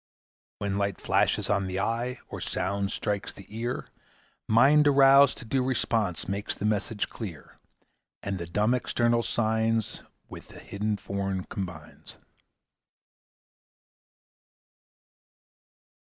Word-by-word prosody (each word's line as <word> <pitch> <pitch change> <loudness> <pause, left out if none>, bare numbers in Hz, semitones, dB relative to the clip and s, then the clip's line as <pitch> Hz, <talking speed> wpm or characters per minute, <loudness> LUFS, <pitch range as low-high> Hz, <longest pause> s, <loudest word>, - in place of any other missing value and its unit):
When 100 -1 -2
light 100 -1 -1
flashes - - +1
on 100 -2 +1
the 95 +1 -3
eye, 120 +4 -1
Or - - -7
sound 100 0 -2
strikes 100 -2 -2
the 100 - -13
ear, 120 +2 -3 0.6
Mind 140 +7 +5
aroused 140 0 +6
to 120 - -9
due 130 +3 0
response 115 -8 0
Makes 100 +2 -3
the - - -4
message 105 0 0
clear; 95 -10 -9 0.6
And 100 -2 -3
the 85 - -5
dumb 105 +7 +1
external 120 -1 +1
signs 110 -1 0 0.3
With - - -11
the - - -13
hidden 105 +1 -3
forms 95 -1 -3
combines. 90 -6 -7
105 Hz, 110 wpm, -27 LUFS, 100-120 Hz, 0.6 s, aroused